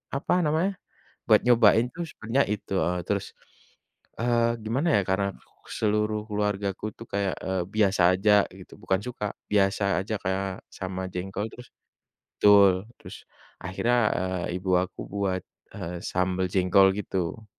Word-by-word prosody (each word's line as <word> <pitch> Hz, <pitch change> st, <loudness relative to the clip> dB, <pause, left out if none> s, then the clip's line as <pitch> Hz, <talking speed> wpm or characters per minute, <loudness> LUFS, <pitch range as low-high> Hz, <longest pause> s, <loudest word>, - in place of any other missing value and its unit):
apa 140 Hz, -, 0 dB
namanya, 160 Hz, +6 st, +1 dB, 0.6 s
buat -, -, +6 dB
nyobain 120 Hz, -1 st, +5 dB
tuh 175 Hz, -, -3 dB
sebenarnya 115 Hz, +6 st, 0 dB
itu, 105 Hz, -, -8 dB
heeh, 90 Hz, +1 st, 0 dB
terus, 100 Hz, -1 st, -1 dB, 0.9 s
eee, 115 Hz, 0 st, +1 dB
gimana 125 Hz, +9 st, -1 dB
ya -, -, +3 dB
karena 95 Hz, +1 st, +1 dB, 0.5 s
seluruh 105 Hz, 0 st, +1 dB
keluargaku 105 Hz, -1 st, -2 dB
tuh 115 Hz, -, -10 dB
kayak, 100 Hz, -2 st, 0 dB
eee, 95 Hz, -1 st, -1 dB
biasa 100 Hz, -3 st, +2 dB
aja 100 Hz, +3 st, +2 dB, 0.3 s
gitu -, -, -13 dB
bukan 95 Hz, 0 st, 0 dB
suka 125 Hz, -4 st, -4 dB, 0.3 s
biasa 100 Hz, 0 st, +2 dB, 0.2 s
aja 110 Hz, -, -5 dB
kayak 95 Hz, +1 st, -1 dB, 0.3 s
sama 95 Hz, -1 st, -4 dB
jengkol 95 Hz, +3 st, -3 dB
terus, 125 Hz, 0 st, -12 dB, 0.7 s
betul 100 Hz, -2 st, +7 dB, 0.3 s
terus -, -, -10 dB, 0.5 s
akhirnya, 105 Hz, +7 st, 0 dB, 0.2 s
eee, 90 Hz, -1 st, -2 dB
ibu 95 Hz, 0 st, -4 dB
aku 95 Hz, 0 st, -7 dB
buat, 95 Hz, -2 st, -1 dB, 0.3 s
eee, 85 Hz, +1 st, -5 dB
sambel 90 Hz, 0 st, 0 dB
jengkol 95 Hz, +1 st, +5 dB
gitu. 95 Hz, +1 st, -3 dB
100 Hz, 135 wpm, -26 LUFS, 95-110 Hz, 0.9 s, betul